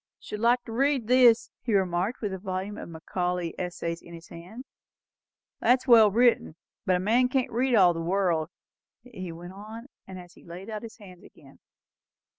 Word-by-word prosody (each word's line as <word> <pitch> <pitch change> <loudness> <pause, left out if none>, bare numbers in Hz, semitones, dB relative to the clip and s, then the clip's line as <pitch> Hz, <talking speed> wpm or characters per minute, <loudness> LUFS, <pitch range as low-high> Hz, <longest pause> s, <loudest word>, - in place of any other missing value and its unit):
"Should 210 - -7
like 240 +2 +2
to 230 - -10
read 270 +1 +1
that," 250 -3 +7 0.2
he 230 -4 -1
remarked, 190 +3 0
with 205 -4 -3
a 190 - -5
volume 190 +1 -4
of - - -8
Macaulay's 175 +1 -3
Essays 170 -2 -4
in 170 - -12
his 165 0 -13
hands. 185 +10 -11 0.9
"That's 250 +1 +2
well 225 -4 +7
written. 230 -6 +2 0.3
But 185 - +3
a - - 0
man 235 +7 +2
can't 260 -1 -1
read 250 +2 +1
all 180 -4 +5
the 165 - -5
world," 170 -3 0 0.5
he 190 -8 -8
went 175 +2 -10
on, 220 +6 -10 0.2
as 180 -2 -11
he - - -19
laid 180 +5 -10
it - - -6
out 215 - -4
of 210 - -9
his 220 - -12
hands 185 -5 -14
again. - - -18
195 Hz, 190 wpm, -27 LUFS, 175-235 Hz, 0.9 s, that